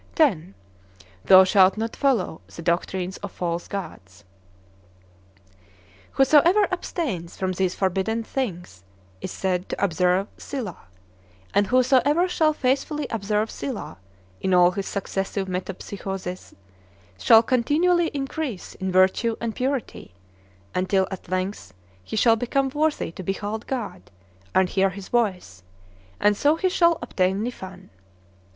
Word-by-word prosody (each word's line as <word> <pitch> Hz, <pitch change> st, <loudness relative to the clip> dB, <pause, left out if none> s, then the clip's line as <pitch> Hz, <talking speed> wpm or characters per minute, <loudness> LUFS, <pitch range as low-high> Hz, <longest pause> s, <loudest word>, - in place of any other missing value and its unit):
X. 300 Hz, -, +5 dB, 0.9 s
Thou 190 Hz, 0 st, +9 dB
shalt 190 Hz, +1 st, +4 dB
not 225 Hz, +1 st, -3 dB
follow 245 Hz, -, 0 dB
the 165 Hz, -, -10 dB
doctrines 180 Hz, +2 st, -1 dB
of 200 Hz, -2 st, -7 dB
false 170 Hz, -1 st, -3 dB
gods. 100 Hz, -, -8 dB, 1.9 s
Whosoever 320 Hz, +9 st, +5 dB
abstains 250 Hz, -, -4 dB
from 185 Hz, -1 st, -1 dB
these 185 Hz, 0 st, -1 dB
forbidden 195 Hz, +4 st, -1 dB
things 180 Hz, -, -5 dB, 0.4 s
is -, -, -4 dB
said 185 Hz, -1 st, -2 dB
to -, -, -3 dB
"observe 180 Hz, +1 st, +2 dB
Silah"; 230 Hz, -, -6 dB, 0.7 s
and 200 Hz, 0 st, +3 dB
whosoever 265 Hz, -, +3 dB
shall 320 Hz, -3 st, +2 dB
faithfully 285 Hz, +2 st, -1 dB
observe 210 Hz, 0 st, -1 dB
Silah, 235 Hz, -, -6 dB, 0.4 s
in 190 Hz, -1 st, +2 dB
all 175 Hz, 0 st, +6 dB
his 195 Hz, +1 st, -4 dB
successive 195 Hz, 0 st, -3 dB
metempsychoses, 185 Hz, 0 st, -6 dB, 0.6 s
shall 225 Hz, -, +7 dB
continually 320 Hz, +9 st, +2 dB
increase 275 Hz, -, -4 dB
in 190 Hz, -1 st, -4 dB
virtue 190 Hz, +5 st, +3 dB
and 230 Hz, -2 st, -3 dB
purity, 255 Hz, -, -3 dB, 0.6 s
until 190 Hz, +1 st, +1 dB
at 190 Hz, -3 st, -8 dB
length 185 Hz, -, -3 dB, 0.3 s
he -, -, -6 dB
shall 225 Hz, +1 st, +5 dB
become 270 Hz, +4 st, 0 dB
worthy 300 Hz, -, -1 dB
to 180 Hz, -, -9 dB
behold 205 Hz, +4 st, -4 dB
God, 210 Hz, -, -5 dB, 0.5 s
and 190 Hz, -1 st, +4 dB
hear 195 Hz, +1 st, +2 dB
his 190 Hz, +1 st, -9 dB
voice; 185 Hz, -, -1 dB, 0.6 s
and 205 Hz, 0 st, +3 dB
so 290 Hz, +8 st, +3 dB
he 370 Hz, +3 st, 0 dB
shall 340 Hz, -2 st, +3 dB
obtain 190 Hz, -2 st, 0 dB
Niphan. 190 Hz, -6 st, -7 dB
200 Hz, 125 wpm, -24 LUFS, 185-260 Hz, 1.9 s, Thou